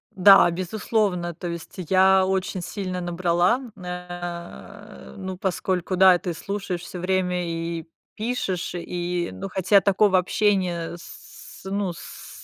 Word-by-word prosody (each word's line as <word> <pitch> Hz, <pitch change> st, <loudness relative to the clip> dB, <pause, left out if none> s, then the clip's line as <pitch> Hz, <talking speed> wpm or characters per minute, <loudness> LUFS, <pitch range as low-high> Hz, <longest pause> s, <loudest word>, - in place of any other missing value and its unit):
Да, 195 Hz, -1 st, +7 dB
безусловно, 185 Hz, -1 st, -1 dB
то 175 Hz, -, -7 dB
есть 170 Hz, -1 st, -7 dB
я 190 Hz, 0 st, +5 dB
очень 190 Hz, -1 st, -1 dB
сильно 185 Hz, 0 st, -4 dB
набрала, 175 Hz, +6 st, +1 dB, 0.2 s
э, 180 Hz, +3 st, -8 dB
ну, 190 Hz, -1 st, -5 dB
поскольку, 185 Hz, -1 st, -1 dB
да, 185 Hz, -1 st, +7 dB
ты 180 Hz, -4 st, -3 dB
слушаешь 195 Hz, -1 st, -4 dB
всё 180 Hz, -, -8 dB
время 180 Hz, -1 st, 0 dB
и 165 Hz, 0 st, -4 dB, 0.3 s
пишешь, 215 Hz, -7 st, -2 dB
и, 175 Hz, 0 st, -3 dB
ну, 195 Hz, -, -6 dB
хотя 190 Hz, +2 st, +4 dB
такого 200 Hz, 0 st, +3 dB
общения 180 Hz, -3 st, 0 dB
с, -, -, -12 dB
ну, 195 Hz, -3 st, -1 dB
с -, -, -10 dB
180 Hz, 125 wpm, -24 LUFS, 175-195 Hz, 0.3 s, Да